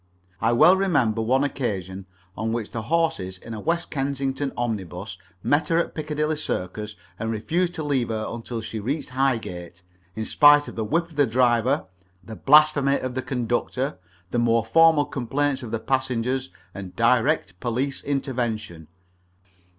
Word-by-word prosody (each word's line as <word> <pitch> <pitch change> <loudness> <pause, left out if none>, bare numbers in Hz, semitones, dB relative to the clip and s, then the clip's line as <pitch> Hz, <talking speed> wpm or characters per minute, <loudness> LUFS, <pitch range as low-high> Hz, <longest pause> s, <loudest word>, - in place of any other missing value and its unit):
I 115 +1 +3
well 160 +10 +6
remember 145 - +1
one 130 +5 +2
occasion 100 -9 -3 0.3
on 110 0 -2
which 115 -2 -3
the 115 - -4
horses 115 - -1
in 115 +5 -9
a 110 - -5
West 170 +7 -1
Kensington 135 0 -2
omnibus 100 -5 -4 0.2
met 145 +2 +2
her 165 - +2
at 170 - 0
Piccadilly 150 0 -2
Circus 105 -6 -4 0.2
and 115 - -2
refused 170 - -1
to 160 - -4
leave 135 -5 0
her 110 -1 -2
until 115 0 -5
she 110 0 -5
reached 130 +6 -3
Highgate, 110 -10 -2 0.3
in 110 0 -3
spite 145 +2 +6
of - - -8
the 110 - -2
whip 165 +9 -1
of 150 - -16
the 145 -2 +4
driver, 125 +3 +2 0.4
the 110 +3 -9
blasphemy 145 0 +5
of 130 -1 -4
the 130 - -2
conductor, 125 +1 -2 0.3
the 120 - +1
more 115 -1 +2
formal 160 +3 +5
complaints 135 +2 -1
of 120 - -7
the 115 - -1
passengers, 130 0 -1 0.2
and 95 -1 -8
direct 115 - +2
police 125 +5 -2
intervention. 120 - -3
125 Hz, 160 wpm, -24 LUFS, 110-145 Hz, 0.4 s, well